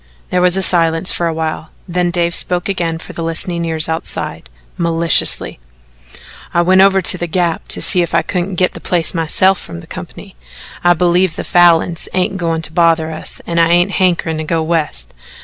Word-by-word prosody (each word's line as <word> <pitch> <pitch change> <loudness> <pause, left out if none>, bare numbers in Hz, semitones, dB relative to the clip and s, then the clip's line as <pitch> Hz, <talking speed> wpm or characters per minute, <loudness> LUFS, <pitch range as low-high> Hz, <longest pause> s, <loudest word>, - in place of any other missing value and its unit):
There 180 - +1
was 180 0 +3
silence 165 0 +2
for 170 - -1
a - - -1
while. 160 0 -4 0.2
Then 175 0 -1
Dave 170 -1 -1
spoke 175 0 0
again 170 -4 -2
for - - -11
the - - -7
listening 170 +1 -2
ears 160 -1 -1
outside 160 - -5 0.3
maliciously: 165 - +1 1.0
"I 170 - +3
went 185 +2 +4
over 195 -1 +3
to 180 - +6
the 175 - -3
Gap 170 -1 -2
to - - +1
see 180 - +4
if 170 - -2
I - - +2
couldn't 180 +1 -3
git 180 +1 0
the - - -9
place 170 -3 0
myself 180 +3 +2
from 85 - -9
the - - -13
company. - - -10 0.5
I 175 0 +4
believe 175 0 +1
the - - -5
Falins 175 -2 +2
ain't 185 +1 -1
goin' 165 -2 -2
to 155 - +1
bother 165 -2 +2
us 155 - -6
an' 170 0 -2
I 165 0 +3
ain't 175 +3 +2
hankerin' 170 -4 0
to - - -3
go 160 +1 -1
West. 155 - -2
170 Hz, 195 wpm, -15 LUFS, 165-180 Hz, 1.0 s, to